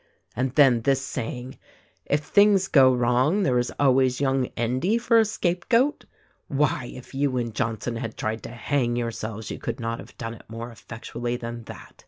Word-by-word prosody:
And 130 0 -1
then 135 -6 +5
this 135 +2 +2
saying, 125 -1 -5 0.5
'If 145 +1 +1
things 200 +1 +4
go 135 -6 +6
wrong 125 +10 +2
there 125 -8 +2
is 120 - -1
always 130 -2 +3
young 135 -2 +1
Endy 130 - +1
for 235 -1 +4
a 220 - +4
scape 180 -4 -2
goat.' 260 +5 +2 0.4
Why, 135 -3 0
if 125 +1 -12
you 135 -1 0
and 120 -2 -2
Johnson 115 +1 -2
had 115 -1 -5
tried 110 +1 -2
to - - -8
hang 120 +1 -1
your 120 -1 -1
selves 110 -2 -6
you - - -6
could - - -4
not 115 0 -3
have - - -13
done 115 -1 -5
it 115 - -15
more 115 +2 -6
effectually 120 +1 -5
than 115 -1 -6
that. - - -11
125 Hz, 190 wpm, -25 LUFS, 115-145 Hz, 0.5 s, go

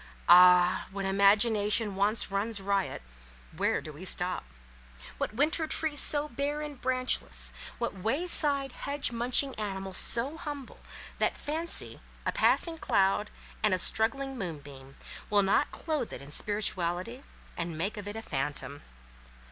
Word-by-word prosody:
Ah! 180 0 +6
when 195 0 -4
imagination 205 +1 +3
once 205 +2 +1
runs 205 +2 -1
riot 195 - -2 0.5
where - - 0
do 155 - -9
we 150 +5 -11
stop? 180 0 -2 0.8
What 215 - -3
winter 310 +4 +1
tree 310 -1 -1
so 295 0 +2
bare 285 +3 -3
and 295 -4 -8
branchless—what 255 -2 -2
way 225 - -2
side, 280 -6 +3
hedge 280 -1 -2
munching 250 +3 +1
animal 195 -2 -5
so 245 +10 +3
humble, 290 -4 -8 0.4
that - - 0
Fancy, 325 +3 +3 0.2
a - - +1
passing 330 -2 +1
cloud, 195 -2 +1 0.3
and 215 -3 +3
a - - -2
struggling 265 +7 -1
moonbeam, 140 -6 -8 0.3
will 205 -1 +3
not 195 +9 +2
clothe 305 -7 -3
it - - -7
in 140 +1 -12
spirituality, 195 - -2 0.3
and 170 -2 -4
make 195 +8 -2
of 205 -1 -8
it 205 - -6
a 225 - -6
phantom? 145 -1 -4
215 Hz, 140 wpm, -29 LUFS, 190-275 Hz, 0.8 s, Ah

